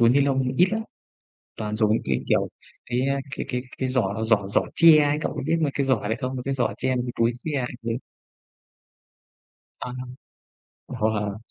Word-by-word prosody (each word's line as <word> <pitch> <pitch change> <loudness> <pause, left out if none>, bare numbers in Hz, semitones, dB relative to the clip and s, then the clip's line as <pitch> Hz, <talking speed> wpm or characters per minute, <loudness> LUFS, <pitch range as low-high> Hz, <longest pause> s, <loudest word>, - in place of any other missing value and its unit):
túi 115 - +6
ni 135 +4 +4
lông 135 -2 +1
ít 180 - +6
lắm, 220 0 0 0.8
toàn 105 0 -3
dùng 110 -1 +2
những 110 - +2
cái, 65 -1 +1
kiểu, - - +2 0.4
cái, 125 0 -1
a, 140 0 +1 0.2
cái - - -3
cái 125 -1 -1 0.2
cái 130 - -1
giỏ 110 -4 0
giỏ 110 -3 +2
giỏ 100 - +2
tre 165 -2 +8
ấy, 145 0 +1
cậu - - -2
có - - -4
biết 160 +2 +2
mấy 150 -3 +1
cái 140 - 0
giỏ 120 -6 +1
đấy 110 - 0
không? 130 -1 -3
Mấy 125 - -4
cái 135 - 0
giỏ 125 -2 0
tre 130 0 0
mấy 125 - 0
cái 120 - -3
túi 115 +1 +4
tre 145 +3 -2
ấy, 125 - -3
đấy. 115 0 -2 1.9
À. - - -4 1.0
Wow! 105 -2 -1
125 Hz, 210 wpm, -25 LUFS, 110-140 Hz, 1.9 s, tre